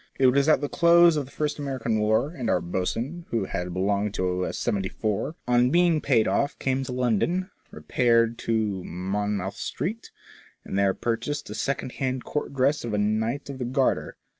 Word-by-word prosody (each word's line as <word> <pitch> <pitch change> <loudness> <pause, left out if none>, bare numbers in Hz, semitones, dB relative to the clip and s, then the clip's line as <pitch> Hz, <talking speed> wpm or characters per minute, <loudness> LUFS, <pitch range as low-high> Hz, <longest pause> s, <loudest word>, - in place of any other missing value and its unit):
It 135 - +3
was 140 +4 +4
at 155 - +4
the 145 - -1
close 170 +1 +5
of 145 -2 -1
the 135 - -16
first 150 -1 -2
American 130 -6 -1
war, 110 +7 +2
and 125 -9 -4
our - - +3
boatswain, 115 - -3
who 115 -4 0
had 90 -1 -4
belonged 100 +3 0
to 90 0 0
a - - -3
seventy 95 -2 -1
four, 110 +8 -2
on 125 0 +4
being 170 0 +3
paid 115 -6 +3
off 140 - 0
came 135 0 -1
to 125 - -5
London, 125 - 0 0.2
repaired 115 -1 +1
to 105 -5 -1
Mon 100 +4 -2
mouth 95 +1 -4
Street, 220 +7 -4 0.6
and - - -5
there 100 -1 +2
purchased 120 +3 -3
a - - -4
secondhand 130 +1 -2
Court 150 - -3
dress 140 +2 +1
of 115 -3 -2
a - - 0
Knight 110 +6 0
of 140 -2 -7
the 125 - -2
Garter. 130 +2 0
120 Hz, 190 wpm, -26 LUFS, 105-140 Hz, 0.6 s, close